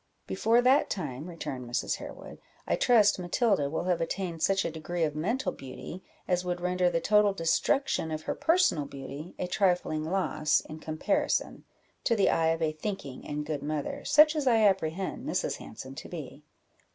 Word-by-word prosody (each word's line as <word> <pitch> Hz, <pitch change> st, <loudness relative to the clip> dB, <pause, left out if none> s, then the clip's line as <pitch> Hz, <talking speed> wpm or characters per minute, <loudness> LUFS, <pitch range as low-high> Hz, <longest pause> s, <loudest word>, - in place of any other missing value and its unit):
"Before 230 Hz, +5 st, +2 dB
that 260 Hz, +3 st, +4 dB
time," 150 Hz, -, -4 dB
returned 130 Hz, -8 st, -6 dB
Mrs. 120 Hz, -, -1 dB
Harewood, -, -, -10 dB, 0.3 s
"I -, -, +1 dB
trust 210 Hz, -5 st, +4 dB
Matilda 180 Hz, -, +1 dB
will 160 Hz, -, -2 dB
have 180 Hz, -2 st, 0 dB
attained 170 Hz, -1 st, -3 dB
such 195 Hz, +2 st, +2 dB
a -, -, -1 dB
degree 165 Hz, +2 st, -3 dB
of 150 Hz, -2 st, 0 dB
mental 225 Hz, -, -1 dB
beauty, 140 Hz, +7 st, -9 dB, 0.3 s
as 180 Hz, -1 st, +1 dB
would 180 Hz, -1 st, -2 dB
render 180 Hz, 0 st, +1 dB
the 170 Hz, -, 0 dB
total 210 Hz, +3 st, +4 dB
destruction 165 Hz, -, +1 dB
of 155 Hz, 0 st, -4 dB
her -, -, -2 dB
personal 260 Hz, -, +2 dB
beauty 140 Hz, +4 st, -8 dB
a -, -, -2 dB
trifling 180 Hz, -4 st, +1 dB
loss, 155 Hz, -3 st, +1 dB
in 155 Hz, 0 st, -10 dB
comparison, 155 Hz, 0 st, -1 dB, 0.4 s
to 230 Hz, -, +3 dB
the 200 Hz, -, +3 dB
eye 165 Hz, -1 st, +2 dB
of 165 Hz, 0 st, +1 dB
a 155 Hz, -, +2 dB
thinking 155 Hz, -4 st, -6 dB
and 150 Hz, 0 st, -3 dB
good 150 Hz, -2 st, -3 dB
mother, 150 Hz, 0 st, -3 dB
such 305 Hz, +1 st, +6 dB
as 295 Hz, -3 st, -1 dB
I 230 Hz, -3 st, +5 dB
apprehend 190 Hz, +3 st, 0 dB
Mrs. 405 Hz, -, -1 dB
Hanson -, -, -9 dB
to -, -, -9 dB
be." -, -, -8 dB
175 Hz, 175 wpm, -29 LUFS, 155-205 Hz, 0.4 s, such